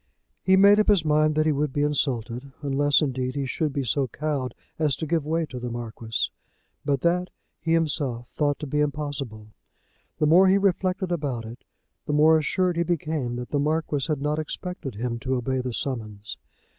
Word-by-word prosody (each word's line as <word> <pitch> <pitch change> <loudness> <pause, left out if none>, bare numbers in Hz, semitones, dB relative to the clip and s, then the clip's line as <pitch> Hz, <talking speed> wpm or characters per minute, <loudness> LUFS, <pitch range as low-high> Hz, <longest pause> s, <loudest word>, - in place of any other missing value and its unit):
He 190 0 +4
made 200 +2 +7
up 215 - +3
his 195 -6 +4
mind 155 0 +3
that 155 0 +2
he 155 - +3
would 145 0 0
be 145 +2 0
insulted, 130 -3 -1
unless 145 +2 +3
indeed 130 -2 -2
he 140 -1 -1
should 150 +3 -1
be 140 0 -2
so 130 +3 0
cowed 135 -1 -3 0.2
as 150 -4 +2
to 160 - -4
give 160 -1 0
way 165 +1 +1
to 130 -4 -7
the 125 0 -4
Marquis. 115 -1 -3 0.5
But, 140 -2 0
that 180 +1 +1 0.3
he 165 - 0
himself 140 -7 0
thought 145 -2 0
to - - -3
be 150 +1 -1
impossible. 145 -7 -3 0.7
The 150 - +2
more 175 +5 +6
he 190 +1 +5
reflected 190 -1 0
about 140 -9 -2
it, 115 +2 -10 0.4
the 150 - 0
more 155 +2 +6
assured 180 +3 0
he 170 - +3
became 155 -7 -2
that 125 0 -6
the 145 - +1
Marquis 150 -1 0
had 150 -3 -1
not 150 +1 0
expected 155 - -5
him 115 +2 -3
to 130 +1 -1
obey 130 +1 -1
the 125 0 -3
summons. 110 -5 -4
145 Hz, 195 wpm, -25 LUFS, 130-160 Hz, 0.7 s, made